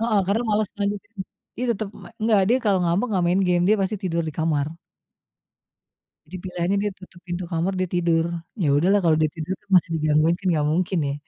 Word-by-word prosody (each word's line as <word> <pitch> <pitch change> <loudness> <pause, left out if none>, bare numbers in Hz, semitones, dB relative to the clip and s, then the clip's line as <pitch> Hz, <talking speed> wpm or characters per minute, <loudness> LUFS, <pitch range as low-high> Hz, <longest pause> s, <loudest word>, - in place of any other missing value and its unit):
heeh, 225 -3 +2
karena 220 +4 +1
males 210 -1 +1
ngelanjutin. 205 +2 -3 0.4
Dia 250 - -2
tetep 215 -1 -4
me - - -11
nggak, 215 -2 +4
dia 245 - +4
kalau 200 -3 +3
ngambek 175 +8 +1
nggak 185 -3 +1
main 180 +3 +2
game, 175 0 +3
dia 215 - +5
pasti 200 +3 -1
tidur 170 -3 -1
di - - -5
kamar. 155 -3 +1 1.6
Jadi 165 +4 -10
pilihannya 180 +1 -1
dia 205 - -1
tutup 185 -1 -14
pintu 175 +1 -3
kamar, 170 +3 0
dia 185 - 0
tidur. 170 -2 +2 0.4
Ya, 150 - +2
udahlah 190 +7 +3
kalau 160 -2 +4
dia 155 - +4
tidur 165 +3 -3
tuh 205 - -36
masih 175 - +4
digangguin, 155 +2 +3
kan, 195 - -4
nggak 150 -3 +1
mungkin 180 +2 0
ye. 140 - -1
185 Hz, 210 wpm, -23 LUFS, 165-205 Hz, 1.6 s, dia